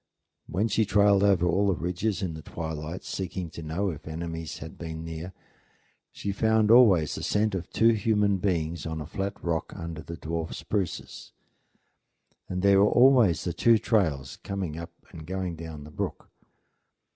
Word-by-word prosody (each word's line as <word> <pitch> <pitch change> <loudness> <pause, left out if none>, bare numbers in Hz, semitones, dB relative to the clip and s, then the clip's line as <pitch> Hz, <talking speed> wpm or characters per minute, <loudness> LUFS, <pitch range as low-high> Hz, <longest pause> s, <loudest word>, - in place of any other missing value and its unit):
When 100 +7 0
she 110 +1 +2
trailed 100 -1 +4
over 100 -3 +4
all 95 +4 +2
the 95 - +2
ridges 90 +3 -2
in 90 -3 -2
the 80 - -8
twilight, 80 +2 -5
seeking 90 -2 -4
to - - -8
know 85 +5 -1
if 75 -1 -10
enemies 80 0 -5
had 80 +1 -9
been 80 -1 -6
near, 80 +2 -6 0.8
she 100 - -4
found 110 +1 +3
always 100 -11 +6
the - - -5
scent 105 0 +1
of 90 -2 -4
two 115 - +4
human 105 -2 +2
beings 85 -4 -1
on 80 0 -4
a 75 - -5
flat 100 +6 -3
rock 85 -2 -2
under 85 -3 -6
the 85 +1 -8
dwarf 80 0 -4
spruces; 100 -5 -4 1.2
and 90 0 -3
there 100 -1 +6
were 105 - +5
always 120 - +5
the 90 - -2
two 115 +5 +4
trails 80 - 0
coming 95 -6 -4
up 85 +1 -7 0.2
and 80 -1 -10
going 95 -2 -3
down 80 -2 -8
the 75 - -11
brook. - - -5
90 Hz, 170 wpm, -27 LUFS, 80-100 Hz, 1.2 s, always